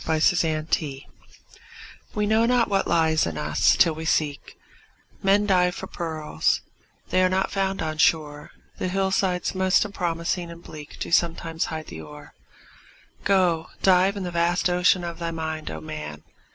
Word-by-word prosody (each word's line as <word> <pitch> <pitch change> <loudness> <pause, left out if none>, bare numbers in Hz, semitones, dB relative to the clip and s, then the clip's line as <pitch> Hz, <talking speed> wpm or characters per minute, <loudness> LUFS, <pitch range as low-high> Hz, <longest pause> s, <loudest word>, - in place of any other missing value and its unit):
HIDDEN 160 -1 +1
GEMS 140 -4 -1 1.1
We 210 0 +1
know 220 +2 +3
not 245 -1 +2
what 195 -1 +1
lies 160 - +2
in 80 -2 -5
us, - - +2
till 165 - +4
we 160 +1 -7
seek; 150 -3 -1 0.6
Men 200 +2 +3
dive 180 -3 +2
for - - -6
pearls—they 160 - -3
are 185 - +4
not 190 +1 0
found 195 -2 -1
on 155 0 -4
shore, 150 -2 +1 0.3
The - - -1
hillsides 190 -1 0
most 190 +1 +2
unpromising 175 -2 -2
and 170 0 -11
bleak 150 -1 -11
Do - - -4
sometimes 165 -1 +1
hide 155 -1 -5
the 80 - -9
ore. 75 -1 -12 0.9
Go, 180 -5 +2 0.2
dive 190 +1 +4
in 195 - -4
the 175 - -4
vast 170 +1 +1
ocean 180 0 +3
of 170 -1 -5
thy 170 -1 -2
mind, 160 -1 -4
O 80 - -6
man! 75 -1 -7
170 Hz, 155 wpm, -24 LUFS, 155-185 Hz, 1.1 s, till